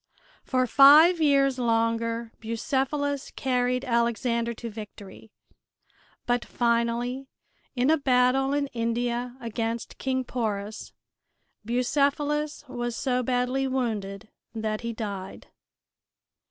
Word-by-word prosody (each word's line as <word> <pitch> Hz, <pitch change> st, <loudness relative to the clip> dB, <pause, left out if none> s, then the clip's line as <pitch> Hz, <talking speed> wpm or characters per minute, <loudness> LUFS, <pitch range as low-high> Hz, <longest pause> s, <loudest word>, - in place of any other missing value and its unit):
For 255 Hz, 0 st, +1 dB
five 300 Hz, +7 st, +7 dB
years 275 Hz, -3 st, +3 dB
longer 230 Hz, 0 st, 0 dB
Bucephalus 270 Hz, +5 st, -2 dB
carried 250 Hz, 0 st, 0 dB
Alexander 235 Hz, 0 st, 0 dB
to 235 Hz, -, -7 dB
victory, 210 Hz, -1 st, -10 dB, 1.0 s
but 245 Hz, 0 st, +1 dB
finally 240 Hz, +2 st, -1 dB, 0.5 s
in 255 Hz, +4 st, +2 dB
a 320 Hz, -, +4 dB
battle 260 Hz, 0 st, +3 dB
in 285 Hz, 0 st, +1 dB
India 240 Hz, +1 st, -2 dB
against 230 Hz, -1 st, -4 dB
King 260 Hz, -1 st, -1 dB
Porus 215 Hz, -4 st, -4 dB, 0.7 s
Bucephalus 285 Hz, +5 st, 0 dB
was 240 Hz, -2 st, -4 dB
so 250 Hz, -1 st, 0 dB
badly 250 Hz, +2 st, 0 dB
wounded 215 Hz, -6 st, -3 dB, 0.3 s
that 220 Hz, 0 st, -2 dB
he 235 Hz, 0 st, -3 dB
died. 200 Hz, -4 st, -6 dB
245 Hz, 100 wpm, -26 LUFS, 230-265 Hz, 1.0 s, five